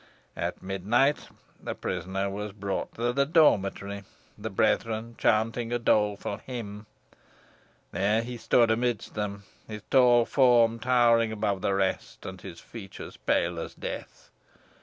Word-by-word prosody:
At - - -4
midnight 105 +10 +1 0.3
the - - -4
prisoner 95 +1 -3
was 100 +1 -5
brought 100 -1 -4
to 120 +1 -1
the 140 +2 +3
dormitory, 100 - +2 0.3
the - - -5
brethren 115 +1 0
chanting 115 +2 +1
a 120 - +1
doleful 105 -3 +1
hymn. 110 -4 -7 1.0
There 105 +4 +1
he 120 +1 -6
stood 115 0 +3
amidst 120 -1 -1
them, 100 -1 -4 0.2
his 105 -2 -7
tall 120 -3 +6
form 120 -4 +4
towering 115 -2 +3
above 105 -3 -1
the 100 - +1
rest, 95 -1 -2
and - - -7
his - - -9
features 100 -5 -10
pale 85 0 0
as - - -6
death. - - -7
110 Hz, 135 wpm, -27 LUFS, 100-120 Hz, 1.0 s, tall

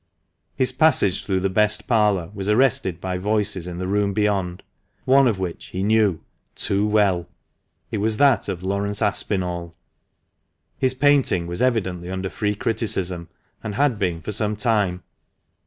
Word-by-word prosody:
His 130 - +1
passage 135 - +4
through 95 -2 -1
the 95 - 0
best 105 +1 +2
parlour 105 -6 +2
was 100 0 -4
arrested 105 -7 +2
by 90 0 -3
voices 105 -2 -1
in 90 -1 -6
the 90 - -3
room 100 +1 0
beyond, 95 -4 -1 0.4
one 135 0 +5
of 110 -5 0
which 90 -3 -5
he 95 - -4
knew 105 -5 +2 0.3
too 100 +2 0
well. 100 -5 +1 0.6
It 105 - -2
was 110 +1 0
that 140 -5 +3
of 90 -2 -4
Laurence 100 +2 -2
Aspinall. 90 -5 -1 1.0
His 130 -1 +1
painting 135 -10 +2
was 85 +1 -5
evidently 95 -8 0
under 95 0 -4
free 105 -1 -1
criticism, 95 -6 -2 0.3
and 105 -2 -5
had 135 -4 +1
been 90 -4 -1
for 105 - -4
some 105 0 -1
time. 105 -5 0
100 Hz, 155 wpm, -22 LUFS, 90-110 Hz, 1.0 s, one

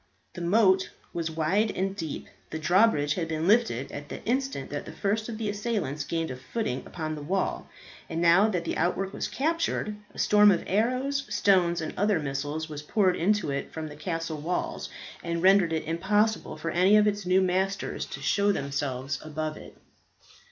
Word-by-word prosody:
The 175 - -7
moat 190 +1 +3 0.2
was 165 -1 -2
wide 165 +7 +1
and 195 0 -2
deep. 160 -6 -5 0.2
The 160 - -4
drawbridge 160 -3 +3
had 165 0 -2
been 160 +1 -2
lifted 205 - +2
at 145 +1 -7
the - - -7
instant 260 - -1
that 145 - -4
the - - -8
first 215 +3 -1
of 225 - -5
the 220 -1 -3
assailants 205 - -2
gained 165 0 -2
a - - -4
footing 130 - -3
upon 155 -2 -4
the 150 - -6
wall. 185 +6 -2 0.4
And 165 - -3
now 170 +5 +5
that 180 -5 -2
the - - -2
outwork 190 +2 0
was - - -2
captured, 315 -8 -1 0.2
a - - -17
storm 210 0 +6
of 180 -4 +2
arrows, 255 +7 0
stones, 185 -5 +3
and 160 - -4
other 205 -3 +2
missiles 145 +2 -3
was 150 -2 -6
poured 185 +4 +2
into 200 -3 +1
it 140 - -3
from 160 -1 -5
the 150 - -10
castle 165 -1 -3
walls, 175 +4 -3 0.3
and 170 0 -2
rendered 190 -3 +5
it 160 -1 -1
impossible 205 +7 0
for 165 - -3
any 185 +4 +5
of 210 - +5
its 205 -2 -1
new 185 +1 +5
masters, 190 +1 -1
to - - -7
show 205 0 +2
themselves 140 -4 -2
above 155 0 -4
it. - - -12
180 Hz, 185 wpm, -27 LUFS, 155-205 Hz, 0.4 s, storm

